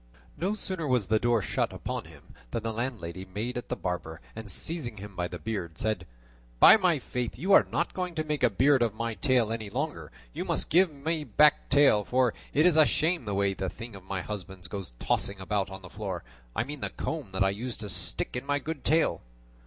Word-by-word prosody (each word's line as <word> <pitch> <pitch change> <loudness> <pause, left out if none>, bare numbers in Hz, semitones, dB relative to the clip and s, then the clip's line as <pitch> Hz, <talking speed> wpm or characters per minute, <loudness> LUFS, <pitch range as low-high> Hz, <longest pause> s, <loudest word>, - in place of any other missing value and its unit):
No 195 +5 -1
sooner 185 -6 -2
was 125 -6 +2
the 110 +3 +2
door 120 -3 +2
shut - - 0
upon - - -4
him - - -16 0.2
than 110 - -3
the 115 0 -2
landlady 110 -7 -4
made 105 +7 -4
at 120 - -5
the - - -1
barber, 85 -3 -4 0.2
and 110 -1 -7
seizing 120 - -3
him 100 0 -9
by 90 0 -1
the 90 - -6
beard, 85 -2 -4
said: 105 -5 -1 0.5
"By - - +10
my 180 -7 +3
faith 125 -3 -4
you 195 +3 +2
are - - +7
not 170 - 0
going 180 -2 -3
to 155 - 0
make 150 -1 -2
a 125 - +5
beard 135 +5 +4
of 115 -3 +1
my 115 0 -2
tail 125 -2 +2
any 110 -2 -3
longer; 145 +8 -3 0.2
you - - -3
must - - -1
give 180 +1 +5
me 155 +2 -2
back 150 0 +6
my - - -27
tail, 140 -8 +6
for 125 +1 +2 0.2
it 150 +3 +3
is 175 -3 +5
a 155 - +9
shame 165 -4 +1
the 100 -2 -2
way 100 0 +2
that 95 -1 -4
thing 115 -2 -8
of 95 - -11
my 95 -1 -3
husband's 95 -2 -7
goes 95 - -5
tossing 100 +9 0
about 100 +1 -1
on 95 0 -9
the - - -8
floor; 95 -5 -4 0.3
I - - +1
mean 145 +3 -7
the - - -1
comb 150 -11 -4
that 95 - +2
I 95 - +3
used 115 +4 -5
to 105 - -4
stick - - -1
in 125 - -2
my 145 +1 +1
good 150 0 -5
tail." 160 +3 +2
115 Hz, 230 wpm, -29 LUFS, 100-145 Hz, 0.5 s, By